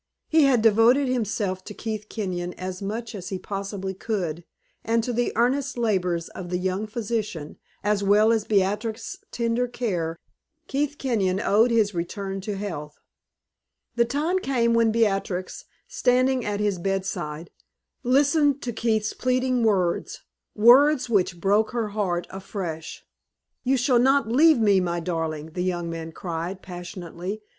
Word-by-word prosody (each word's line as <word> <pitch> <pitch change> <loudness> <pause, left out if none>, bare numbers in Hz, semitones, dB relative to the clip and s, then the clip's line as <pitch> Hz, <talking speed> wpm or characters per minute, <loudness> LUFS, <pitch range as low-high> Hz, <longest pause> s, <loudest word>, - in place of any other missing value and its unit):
He 315 -2 +5
had 250 -5 +3
devoted 230 +5 +5
himself 210 -6 -1
to 210 - -8
Keith 215 -2 -5
Kenyon 180 -4 -3
as 185 0 -6
much 225 +4 -4
as 185 -4 -6
he 190 - -3
possibly 195 0 -4
could, 180 -5 -3 0.4
and 230 +1 +1
to 245 - -2
the 240 +1 0
earnest 260 +4 +1
labors 180 -7 0
of 180 -2 -8
the 180 - 0
young 190 +3 -2
physician, 215 -8 -4 0.2
as 205 0 +1
well 210 +3 +5
as 225 -2 +2
Beatrix's 215 - -1
tender 235 +1 0
care, 175 -10 -2 0.5
Keith 290 -1 -1
Kenyon 200 -8 0
owed 220 +4 +3
his 220 -3 +2
return 195 +3 -4
to 205 +1 -4
health. 160 -7 -5 1.0
The 235 - +3
time 300 +9 0
came 240 -7 +1
when 230 -1 +4
Beatrix, 195 -4 -1 0.2
standing 255 0 +2
at 205 -1 -2
his 205 -3 0
bedside, 175 -4 -3 0.5
listened 285 +2 +3
to 240 - -3
Keith's 220 -1 0
pleading 255 0 +1
words 190 -6 0 0.3
words 250 +4 +6
which 185 -4 +1
broke 205 +5 +2
her 230 -3 -1
heart 185 -4 -1
afresh. 185 -4 -6 0.6
"You 265 +1 +2
shall 250 0 +3
not 270 0 +3
leave 300 +7 +5
me, 205 -4 +4
my 175 -1 -1
darling!" 160 -2 -3
the 180 - -4
young 175 -2 -2
man 165 0 -6
cried, 175 +3 -5
passionately. 180 +2 -7
210 Hz, 145 wpm, -25 LUFS, 185-240 Hz, 1.0 s, words